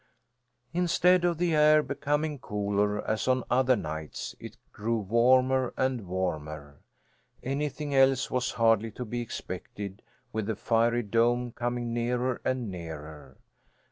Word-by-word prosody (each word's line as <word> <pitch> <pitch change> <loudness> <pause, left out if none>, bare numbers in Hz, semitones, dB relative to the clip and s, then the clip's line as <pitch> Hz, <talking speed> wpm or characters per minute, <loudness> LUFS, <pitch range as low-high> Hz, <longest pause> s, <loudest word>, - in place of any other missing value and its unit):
Instead 180 +1 +3
of 175 -2 +1
the 175 -1 +1
air 150 0 +5
becoming 145 +2 -1
cooler, 105 -1 -1
as 110 +2 -1
on 130 0 +2
other 130 0 +4
nights, 80 -5 -5
it - - -10 0.2
grew 115 +2 -1
warmer 125 +4 +3
and 130 -6 -1
warmer. 75 -6 -4 0.6
Anything 145 +1 -2
else 135 -1 +4
was 125 0 0
hardly 115 -1 +3
to 125 +3 -6
be 120 +2 -3
expected, 100 -3 -7 0.3
with 110 -2 -2
the 110 - -1
fiery 115 +2 +1
dome 120 +3 +1
coming 120 0 -3
nearer 125 +1 -1
and 125 -5 -1
nearer. 80 -5 -9
120 Hz, 130 wpm, -28 LUFS, 105-130 Hz, 0.6 s, air